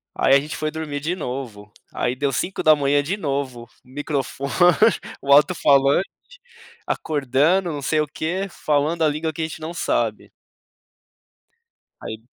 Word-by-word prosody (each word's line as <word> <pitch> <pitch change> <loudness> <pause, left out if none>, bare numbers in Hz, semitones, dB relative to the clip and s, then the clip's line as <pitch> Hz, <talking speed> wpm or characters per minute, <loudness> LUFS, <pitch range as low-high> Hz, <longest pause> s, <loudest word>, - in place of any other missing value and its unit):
aí 135 - +3
a - - +6
gente 150 +2 -6
foi 155 0 -2
dormir 155 -2 -4
de 160 +5 -2
novo, 125 - -6 0.2
aí 125 - -1
deu 140 +1 -1
5h 145 -3 +2
de 170 +8 -3
novo, 135 - -3 0.2
microfone, 140 0 -4 0.7
o 140 - -2
alto-falante 145 +1 +4 0.8
acordando 155 +5 +1
não 145 -2 -5
sei 155 +3 +1
o 150 - -2
quê, 175 +6 -3
falando 150 +2 0
a - - +5
língua 155 +2 -3
que 160 - -5
a - - 0
gente 160 - -9
não 160 +2 -5
sabe. - - -1 1.7
Aí 110 +1 -8
145 Hz, 140 wpm, -22 LUFS, 135-160 Hz, 1.7 s, a